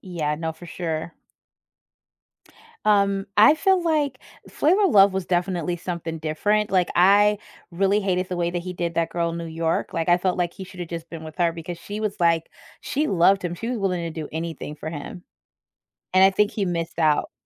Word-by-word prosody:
Yeah, 160 Hz, -5 st, -2 dB
no, 160 Hz, +1 st, -3 dB
for 160 Hz, +2 st, -13 dB
sure. 165 Hz, -1 st, -4 dB, 1.7 s
Um, 200 Hz, -1 st, +2 dB
I 295 Hz, -, +7 dB
feel 380 Hz, +2 st, +2 dB
like 300 Hz, -6 st, 0 dB, 0.3 s
Flavor 370 Hz, +8 st, +2 dB
of 380 Hz, -, +3 dB
Love 200 Hz, -3 st, +6 dB
was 190 Hz, -2 st, -3 dB
definitely 175 Hz, -1 st, -1 dB
something 170 Hz, -2 st, -5 dB
different, 205 Hz, +8 st, 0 dB
like, 180 Hz, -3 st, +2 dB
I 205 Hz, +3 st, +5 dB, 0.3 s
really 195 Hz, +4 st, +1 dB
hated 185 Hz, -2 st, -1 dB
the 180 Hz, -, -3 dB
way 170 Hz, 0 st, 0 dB
that 175 Hz, 0 st, -3 dB
he 180 Hz, +1 st, -5 dB
did 170 Hz, -1 st, -3 dB
that 165 Hz, 0 st, 0 dB
girl 170 Hz, -1 st, -1 dB
New 170 Hz, 0 st, -5 dB
York, 165 Hz, 0 st, -2 dB
like, 165 Hz, 0 st, -2 dB
I 175 Hz, 0 st, +5 dB
felt 180 Hz, 0 st, 0 dB
like 175 Hz, -1 st, 0 dB
he 190 Hz, -, -9 dB
should 185 Hz, -1 st, -12 dB
have 175 Hz, -, -5 dB
just 165 Hz, -1 st, -6 dB
been 165 Hz, -2 st, -8 dB
with 155 Hz, 0 st, -10 dB
her 170 Hz, -1 st, +2 dB
because 170 Hz, +1 st, -7 dB
she 205 Hz, +4 st, -6 dB
was, 215 Hz, -2 st, -2 dB
like 165 Hz, -1 st, +2 dB, 0.3 s
she 295 Hz, +3 st, -1 dB
loved 195 Hz, -, +3 dB
him, 175 Hz, -1 st, -2 dB
she 225 Hz, +7 st, -5 dB
was 250 Hz, -1 st, -2 dB
willing 185 Hz, -3 st, -1 dB
to 160 Hz, -, -6 dB
do 150 Hz, -, -6 dB
anything 160 Hz, -1 st, -5 dB
for 155 Hz, +1 st, -6 dB
him. 165 Hz, +3 st, -8 dB, 0.9 s
And 185 Hz, -, +6 dB
I 195 Hz, -, +7 dB
think 210 Hz, +2 st, +2 dB
he 205 Hz, -, -2 dB
missed 170 Hz, -2 st, -3 dB
out. 155 Hz, -3 st, +2 dB
175 Hz, 205 wpm, -23 LUFS, 165-200 Hz, 1.7 s, I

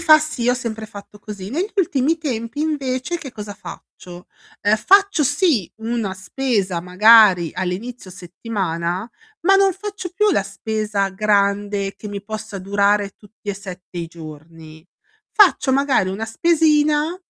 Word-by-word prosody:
fa 310 Hz, -2 st, +7 dB
sì, 305 Hz, -6 st, -2 dB
ho 245 Hz, -, +4 dB
sempre 225 Hz, -3 st, -5 dB
fatto 205 Hz, 0 st, -12 dB
così. 200 Hz, -2 st, -8 dB
Negli 355 Hz, -, -2 dB
ultimi 320 Hz, -3 st, +1 dB
tempi, 260 Hz, -2 st, -4 dB
invece, 285 Hz, +1 st, -2 dB
che 280 Hz, -6 st, -8 dB
cosa 210 Hz, -4 st, -8 dB
faccio: 175 Hz, 0 st, -12 dB, 0.4 s
uhm, 205 Hz, +1 st, +3 dB
faccio 390 Hz, -, +4 dB
sì 285 Hz, -, +1 dB
una 225 Hz, -3 st, -3 dB
spesa 190 Hz, -3 st, -2 dB
magari 185 Hz, -1 st, +6 dB
all'inizio 185 Hz, +4 st, -5 dB
settimana, 180 Hz, 0 st, -4 dB, 0.3 s
ma 390 Hz, +3 st, +5 dB
non 390 Hz, 0 st, +4 dB
faccio 390 Hz, -2 st, -7 dB
più 420 Hz, +2 st, +3 dB
la 305 Hz, -, +2 dB
spesa 210 Hz, 0 st, -2 dB
grande 200 Hz, 0 st, 0 dB
che 210 Hz, -, -9 dB
mi 200 Hz, -1 st, -6 dB
possa 215 Hz, -1 st, -6 dB
durare 200 Hz, +1 st, +1 dB
tutti 210 Hz, +1 st, -17 dB
e -, -, -4 dB
7 185 Hz, -2 st, -9 dB
i 170 Hz, -, -4 dB
giorni. 160 Hz, 0 st, -12 dB, 0.5 s
Faccio, 375 Hz, -9 st, +4 dB
magari, 270 Hz, -8 st, +2 dB
una 195 Hz, +4 st, -3 dB
spesina 305 Hz, +4 st, +2 dB
215 Hz, 140 wpm, -20 LUFS, 195-285 Hz, 0.5 s, fa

